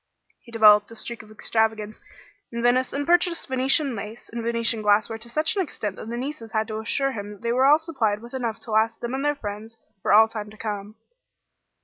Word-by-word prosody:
He 235 - -17
developed 210 -2 +6
a 230 - -11
streak 235 +1 -5
of 215 - -17
extravagance 220 -1 -1 0.5
in 235 0 -4
Venice, 250 +1 +2
and 285 +1 -2
purchased 345 0 +2
Venetian 265 +1 +3
lace 215 +3 -8
and 235 - -3
Venetian 230 -1 +1
glassware 215 +2 +2
to 235 +1 -9
such 310 - 0
an 395 - +1
extent 210 - -4
that - - -8
the 235 - -4
nieces 250 -3 -6
had 220 0 0
to 215 0 -3
assure 275 +5 0
him 205 -4 -7
they 235 0 -1
were 260 +3 +3
all 295 +2 +7
supplied 260 -11 -1
with 235 - -12
enough 235 -4 -3
to 225 - -9
last 220 +1 +2
them 240 +1 -4
and 270 +1 -2
their 295 0 +1
friends 220 -1 -7 0.2
for - - 0
all 220 +2 +7
time 215 -2 -6
to 215 - -15
come. 210 -1 -5
230 Hz, 220 wpm, -24 LUFS, 215-260 Hz, 0.5 s, all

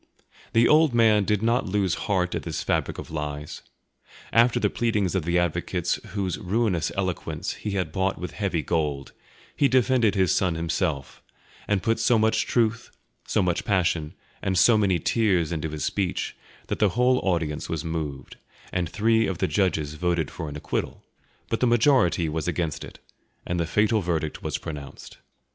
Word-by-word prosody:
The 115 +1 +5
old 155 -4 +4
man 110 -3 +4
did 105 +1 0
not 115 +1 +1
lose 95 -2 +1 0.2
heart 90 -3 +1
at - - -2
this - - -4
fabric - - -1
of - - -8
lies; 75 -1 -5 0.7
after 120 +1 +4
the - - +2
pleadings 105 -6 0
of 95 -5 -1
the 85 +1 +1
advocates 85 0 0
whose 95 -3 -2
ruinous 100 -3 0
eloquence 95 -3 -2
he 105 - -5
had 90 - -2
bought 95 0 0
with 90 - -5
heavy 95 -6 -2
gold, 75 -5 -1 0.4
he 140 - +3
defended 125 -4 +3
his 95 -2 +3
son 90 -3 +1
himself, 80 -4 -2 0.5
and 100 -2 0
put 115 0 +1
so 120 - +3
much 110 +1 +2
truth, 115 -1 0 0.4
so - - +1
much 90 +4 0
passion, 90 -6 0 0.3
and 95 -2 0
so 110 +6 +6
many 100 -4 +2
tears 90 -2 +1
into 80 -1 -2
his 75 0 -3
speech, 95 -3 -2 0.3
that - - -4
the 105 - +4
whole 125 +1 +4
audience 80 -5 -1
was 80 0 -3
moved, 80 -5 -5 0.4
and 90 -3 -1
three 110 +3 +2
of 95 - -3
the - - 0
judges 80 -7 0
voted 85 -1 -1
for 80 -3 -6
an 75 - -8
acquittal; - - -4 0.4
but 115 - -1
the 125 - +3
majority 120 - +3
was 80 0 -3
against 80 -4 -2
it, - - -11 0.5
and 90 0 -2
the 85 - 0
fatal 105 +3 +2
verdict 80 -4 -2
was - - -2
pronounced. 75 -3 -9
95 Hz, 175 wpm, -25 LUFS, 80-110 Hz, 0.7 s, so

